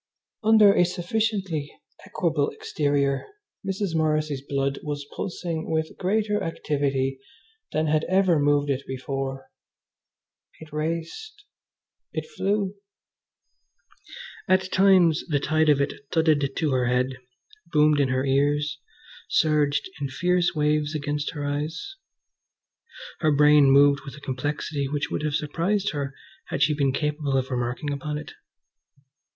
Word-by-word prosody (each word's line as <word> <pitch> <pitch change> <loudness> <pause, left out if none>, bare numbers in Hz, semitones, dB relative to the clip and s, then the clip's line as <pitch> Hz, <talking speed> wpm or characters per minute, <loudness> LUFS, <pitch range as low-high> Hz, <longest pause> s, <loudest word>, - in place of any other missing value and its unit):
Under 215 -2 +6
a 180 - +4
sufficiently 180 -3 -1 0.4
equable 165 -8 0
exterior 140 -2 -1 0.4
Mrs. 195 -2 -2
Morrissy's 155 -3 0
blood 140 0 -2
was 145 -1 -4
pulsing 170 -3 -4
with 160 0 -1
greater 210 +2 0
activity 140 -4 -1 0.5
than 155 +1 0
had 155 0 +1
ever 185 -4 +3
moved 145 0 +2
it 135 0 -1
before. 135 +1 -4 1.1
It 155 -1 -13
raced! 170 - -4 0.7
It - - -3
flew! 205 - -1 1.7
At 185 0 +2
times 185 -4 +4
the 145 -4 +1
tide 155 +2 +2
of 145 -2 +4
it 140 0 0 0.2
thudded 155 -4 +2
to 155 -3 0
her 125 -1 +1
head, 125 +1 0 0.5
boomed 150 -1 +4
in 140 - +3
her 130 +1 0
ears, 145 +2 +1 0.5
surged 150 -2 +2
in 140 - -2
fierce 175 +5 +1
waves 150 0 +1
against 145 0 -2
her 145 -1 -3
eyes. 150 - -4 1.2
Her 155 - +2
brain 150 -1 +6
moved 140 +1 +5
with 140 -1 -9
a - - -12
complexity 140 +1 -3
which 145 +1 -3
would - - -2
have 150 -1 -1
surprised 185 +8 0
her 140 -2 -4 0.3
had 140 - 0
she 150 +2 +3
been 140 -2 +1
capable 150 -1 -1
of 130 +1 -2
remarking 125 +4 -2
upon 150 +2 -4
it. 150 -1 -8
150 Hz, 130 wpm, -25 LUFS, 140-170 Hz, 1.7 s, Under